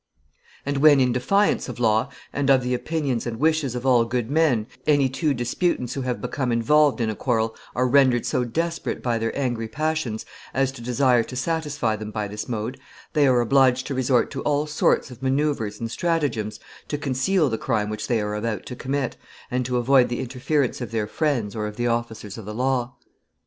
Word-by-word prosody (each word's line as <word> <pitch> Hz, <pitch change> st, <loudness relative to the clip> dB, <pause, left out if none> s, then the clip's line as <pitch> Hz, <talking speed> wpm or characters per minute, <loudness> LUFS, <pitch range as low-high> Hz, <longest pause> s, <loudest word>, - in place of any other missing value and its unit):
And 140 Hz, 0 st, -1 dB
when, 145 Hz, 0 st, +6 dB
in 125 Hz, -1 st, +3 dB
defiance 195 Hz, +9 st, +1 dB
of 120 Hz, -, -7 dB
law, 110 Hz, +2 st, +2 dB, 0.2 s
and 140 Hz, -1 st, 0 dB
of 135 Hz, -2 st, +5 dB
the 125 Hz, 0 st, -1 dB
opinions 135 Hz, -3 st, -1 dB
and 115 Hz, -1 st, -4 dB
wishes 155 Hz, -4 st, +1 dB
of 125 Hz, +1 st, -4 dB
all 125 Hz, -3 st, +5 dB
good 120 Hz, +1 st, -2 dB
men, 145 Hz, -8 st, +3 dB, 0.2 s
any 145 Hz, -3 st, +4 dB
two 135 Hz, +4 st, -1 dB
disputants 125 Hz, +1 st, -1 dB
who 135 Hz, -, -3 dB
have 125 Hz, -1 st, -2 dB
become 130 Hz, -4 st, -2 dB
involved 145 Hz, +5 st, +3 dB
in 110 Hz, -2 st, 0 dB
a -, -, -5 dB
quarrel 110 Hz, -1 st, 0 dB, 0.2 s
are 125 Hz, +1 st, +2 dB
rendered 130 Hz, -2 st, +4 dB
so 125 Hz, -, 0 dB
desperate 165 Hz, +8 st, -3 dB
by 120 Hz, -2 st, 0 dB
their 115 Hz, 0 st, -1 dB
angry 120 Hz, -5 st, -1 dB
passions 150 Hz, -3 st, -2 dB, 0.3 s
as 135 Hz, 0 st, +2 dB
to 135 Hz, -, -11 dB
desire 125 Hz, 0 st, +3 dB
to 130 Hz, -, -8 dB
satisfy 145 Hz, -5 st, -1 dB
them 110 Hz, 0 st, -6 dB
by 105 Hz, -1 st, -3 dB
this 105 Hz, +4 st, -6 dB
mode, 115 Hz, +3 st, -3 dB, 0.3 s
they 150 Hz, -3 st, +4 dB
are 125 Hz, -2 st, +4 dB
obliged 130 Hz, +1 st, +3 dB
to 140 Hz, -, -3 dB
resort 130 Hz, -1 st, +2 dB
to 135 Hz, -, -4 dB
all 145 Hz, 0 st, +1 dB
sorts 150 Hz, -2 st, +1 dB
of 125 Hz, 0 st, -12 dB
manoeuvres 135 Hz, -5 st, 0 dB
and 115 Hz, -1 st, -4 dB
stratagems 140 Hz, -, -1 dB, 0.3 s
to 145 Hz, -, -2 dB
conceal 145 Hz, +5 st, +1 dB
the 110 Hz, -3 st, -2 dB
crime 110 Hz, -5 st, 0 dB
which 105 Hz, -, -4 dB
they 120 Hz, -2 st, +1 dB
are 105 Hz, 0 st, -2 dB
about 105 Hz, -1 st, -3 dB
to 125 Hz, -, -6 dB
commit, 135 Hz, 0 st, -2 dB, 0.3 s
and 125 Hz, 0 st, 0 dB
to 125 Hz, -1 st, 0 dB
avoid 125 Hz, +1 st, +4 dB
the 120 Hz, -, -3 dB
interference 130 Hz, +2 st, -1 dB
of 120 Hz, -, -4 dB
their 110 Hz, -2 st, -1 dB
friends 120 Hz, -3 st, -1 dB
or 105 Hz, -1 st, -2 dB
of 105 Hz, -, -7 dB
the 120 Hz, -, -2 dB
officers 115 Hz, -3 st, -3 dB
of 110 Hz, -, -9 dB
the 105 Hz, +1 st, -6 dB
law. 125 Hz, 0 st, 0 dB
125 Hz, 205 wpm, -24 LUFS, 115-140 Hz, 0.3 s, when